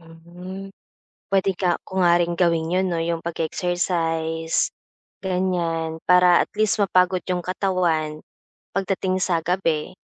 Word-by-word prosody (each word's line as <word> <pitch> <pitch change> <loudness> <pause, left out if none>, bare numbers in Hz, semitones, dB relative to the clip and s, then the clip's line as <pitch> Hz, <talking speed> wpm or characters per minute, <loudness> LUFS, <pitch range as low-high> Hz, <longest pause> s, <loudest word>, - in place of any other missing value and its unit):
Mhm. 175 +4 -10 0.6
Puwede 195 -1 +2
ka 180 -1 0
ko 190 - -3
nga 175 -1 +5
rin 175 0 +1
gawin 170 -1 +1
'yon, 185 +1 +2
'no, 175 - -1
'yong 165 0 -1
pag-e-exercise, 165 -1 -1 0.5
ganiyan. 175 -4 -1
Para 180 -1 +6
at - - 0
least 215 0 +1
mapagod 185 -2 +3
'yong 180 -1 -1
katawan 175 -5 -1 0.5
pagdating 190 -1 -1
sa 175 -2 +1
gabi, 165 -4 0
175 Hz, 125 wpm, -23 LUFS, 165-185 Hz, 0.6 s, Para